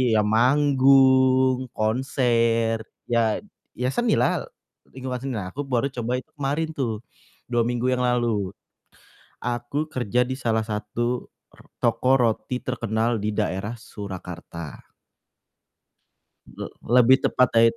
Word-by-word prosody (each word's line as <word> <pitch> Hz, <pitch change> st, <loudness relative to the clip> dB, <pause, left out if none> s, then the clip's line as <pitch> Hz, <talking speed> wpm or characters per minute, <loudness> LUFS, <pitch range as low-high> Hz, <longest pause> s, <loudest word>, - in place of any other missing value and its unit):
ya 105 Hz, -, +5 dB
manggung, 130 Hz, +1 st, +4 dB
konser 115 Hz, -1 st, +1 dB, 0.3 s
ya 115 Hz, -, +2 dB, 0.3 s
ya 125 Hz, -, -1 dB
seni 240 Hz, -, +1 dB
lah, -, -, +1 dB, 0.5 s
lingkungan 130 Hz, -1 st, -4 dB
seni 135 Hz, 0 st, -4 dB
lah. 95 Hz, -4 st, -4 dB
Aku 145 Hz, +1 st, -5 dB
baru 130 Hz, +1 st, 0 dB
coba 120 Hz, -1 st, -2 dB
itu -, -, -17 dB
kemarin 145 Hz, +3 st, -1 dB
tuh 120 Hz, -7 st, -3 dB, 0.5 s
2 120 Hz, -1 st, +3 dB
minggu 120 Hz, +1 st, 0 dB
yang 125 Hz, 0 st, 0 dB
lalu. 115 Hz, -6 st, 0 dB, 0.9 s
Aku 120 Hz, +5 st, -2 dB
kerja 125 Hz, 0 st, +1 dB
di 130 Hz, +1 st, -3 dB
salah 110 Hz, -2 st, +1 dB
satu 110 Hz, +3 st, -3 dB, 0.3 s
r -, -, -19 dB, 0.2 s
toko 130 Hz, +1 st, +3 dB
roti 120 Hz, 0 st, 0 dB
terkenal 115 Hz, -2 st, -1 dB
di 105 Hz, -, -2 dB
daerah 105 Hz, +1 st, -2 dB
Surakarta. 90 Hz, -, -9 dB, 1.6 s
Le -, -, -7 dB, 0.3 s
lebih 130 Hz, +2 st, +6 dB
tepatnya 115 Hz, -2 st, +4 dB
it -, -, -18 dB
120 Hz, 120 wpm, -24 LUFS, 110-130 Hz, 1.6 s, lebih